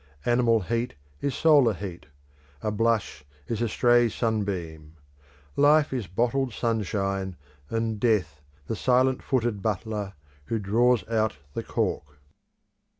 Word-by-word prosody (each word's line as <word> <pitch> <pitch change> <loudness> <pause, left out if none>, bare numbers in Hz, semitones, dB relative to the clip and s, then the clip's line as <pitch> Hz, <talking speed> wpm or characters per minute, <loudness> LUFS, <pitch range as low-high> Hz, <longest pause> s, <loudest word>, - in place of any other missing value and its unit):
Animal 120 -2 +3
heat 115 +5 -2 0.3
is 140 -2 -1
solar 145 -8 +5
heat; 90 -4 -7 0.6
a 105 - 0
blush 110 -8 0 0.2
is 115 -1 -3
a 120 - +1
stray 120 +1 +4
sunbeam; 90 -9 -3 0.6
Life 145 0 +4
is 120 -7 -3
bottled 120 +7 0
sunshine, 100 -4 -1 0.3
and 115 -1 -1
Death 105 - +1 0.2
the 110 - -3
silent 130 +3 +2
footed 120 -6 -1
butler 105 -1 -2 0.3
who 115 - -1
draws 115 +4 +2
out 110 -6 0 0.2
the - - -2
cork. 75 0 -3
110 Hz, 120 wpm, -26 LUFS, 100-120 Hz, 0.6 s, solar